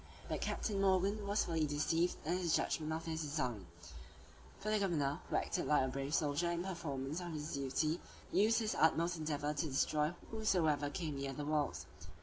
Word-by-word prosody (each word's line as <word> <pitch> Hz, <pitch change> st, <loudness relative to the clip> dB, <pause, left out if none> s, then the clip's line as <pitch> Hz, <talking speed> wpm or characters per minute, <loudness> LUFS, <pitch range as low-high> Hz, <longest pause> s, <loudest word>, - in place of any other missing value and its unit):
But -, -, -2 dB
Captain 200 Hz, -3 st, -1 dB
Morgan 195 Hz, +2 st, +2 dB
was 205 Hz, +1 st, +2 dB
fully 160 Hz, -2 st, +1 dB
deceived 155 Hz, +4 st, +1 dB
in 170 Hz, +3 st, +1 dB
his 175 Hz, -3 st, +2 dB
judgment 155 Hz, -1 st, 0 dB
of 160 Hz, +1 st, -3 dB
this 160 Hz, -1 st, -2 dB
design; 125 Hz, -, -2 dB, 0.9 s
for 215 Hz, -, -3 dB
the 215 Hz, -, +3 dB
governor, 155 Hz, -6 st, +1 dB
who -, -, -1 dB
acted 180 Hz, -, 0 dB
like 150 Hz, -3 st, +4 dB
a -, -, +1 dB
brave 140 Hz, +3 st, -2 dB
soldier 150 Hz, +3 st, +1 dB
in 170 Hz, 0 st, -1 dB
performance 155 Hz, -5 st, -3 dB
of 175 Hz, -2 st, -5 dB
his 150 Hz, +1 st, -4 dB
duty, 150 Hz, +4 st, 0 dB, 0.3 s
used 220 Hz, +3 st, +4 dB
his 220 Hz, -2 st, +1 dB
utmost 170 Hz, +2 st, +3 dB
endeavor 150 Hz, -1 st, -1 dB
to 155 Hz, +2 st, -1 dB
destroy 150 Hz, +3 st, +1 dB, 0.2 s
whomsoever 170 Hz, -10 st, +2 dB
came 155 Hz, -2 st, -3 dB
near 135 Hz, 0 st, -3 dB
the 145 Hz, +2 st, -4 dB
walls. 150 Hz, -1 st, 0 dB
160 Hz, 180 wpm, -36 LUFS, 145-175 Hz, 0.9 s, like